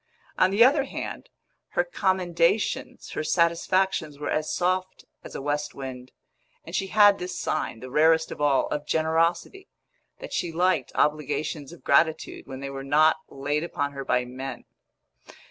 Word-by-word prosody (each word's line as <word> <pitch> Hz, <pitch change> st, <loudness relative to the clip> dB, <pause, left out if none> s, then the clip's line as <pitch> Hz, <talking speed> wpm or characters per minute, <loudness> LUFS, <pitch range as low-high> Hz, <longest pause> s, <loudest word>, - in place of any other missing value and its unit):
On 185 Hz, -, +4 dB
the 200 Hz, +4 st, +5 dB
other 275 Hz, +2 st, +4 dB
hand, -, -, -6 dB, 0.4 s
her -, -, +2 dB
commendations, 185 Hz, -, 0 dB
her -, -, -3 dB
satisfactions 170 Hz, -1 st, +1 dB
were 145 Hz, -, -4 dB
as 155 Hz, 0 st, -1 dB
soft 185 Hz, +1 st, -1 dB, 0.2 s
as -, -, -10 dB
a -, -, -5 dB
west 145 Hz, +1 st, -2 dB
wind; 130 Hz, -2 st, -8 dB, 0.5 s
and -, -, -10 dB
she 195 Hz, -, -1 dB
had 205 Hz, 0 st, +5 dB
this 180 Hz, +1 st, -5 dB
sign, 110 Hz, -, -2 dB
the 130 Hz, 0 st, -8 dB
rarest 160 Hz, +2 st, +3 dB
of -, -, -7 dB
all, 145 Hz, -2 st, +3 dB
of 150 Hz, 0 st, -3 dB
generosity, 165 Hz, -, 0 dB, 0.5 s
that -, -, -9 dB
she 170 Hz, -, -1 dB
liked 175 Hz, -4 st, +1 dB
obligations 150 Hz, -1 st, -1 dB
of 170 Hz, -, -14 dB
gratitude 155 Hz, +3 st, +1 dB
when 130 Hz, 0 st, -8 dB
they 140 Hz, -, -4 dB
were 135 Hz, 0 st, -6 dB
not 155 Hz, +3 st, +4 dB
laid 145 Hz, +3 st, -2 dB
upon 145 Hz, -4 st, -2 dB
her 140 Hz, -1 st, -6 dB
by 125 Hz, -1 st, +1 dB
men. 130 Hz, +2 st, -7 dB
160 Hz, 160 wpm, -26 LUFS, 145-185 Hz, 0.5 s, the